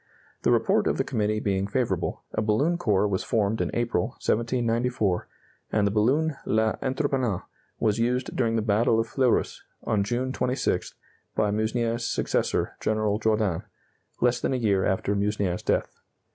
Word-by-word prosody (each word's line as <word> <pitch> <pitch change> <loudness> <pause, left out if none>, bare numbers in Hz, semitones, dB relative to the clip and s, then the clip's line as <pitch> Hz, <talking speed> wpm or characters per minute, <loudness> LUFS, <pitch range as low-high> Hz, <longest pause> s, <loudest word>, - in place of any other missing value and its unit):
The - - +2
report - - +3
of - - +1
the - - +1
committee 105 0 0
being 100 -2 0
favorable, 105 -5 -1
a 110 - 0
balloon 140 +11 +1
corps 105 - +2
was 95 -2 -1
formed 110 0 0
in - - 0
April, 120 0 0 0.2
1794, 115 -3 0 0.4
and 105 -2 +2
the 100 - +2
balloon 135 +9 +2
L'Entreprenant 125 - 0 0.4
was 110 -1 +1
used 125 +2 0
during 115 -3 +1
the 110 - +1
battle 110 +1 +3
of 115 - +1
Fleurus, 125 +1 +1 0.2
on 105 -2 +1
June 125 +5 -1
26th, 125 0 -1 0.4
by 105 - +2
Meusnier's 115 +2 0
successor, - - 0
General 110 -1 0
Jourdan, 105 -5 +1 0.6
less 125 0 +2
than - - 0
a - - +1
year 100 -5 +2
after 95 +1 0
Meusnier's 100 -3 0
death. - - -1
110 Hz, 150 wpm, -26 LUFS, 105-120 Hz, 0.6 s, report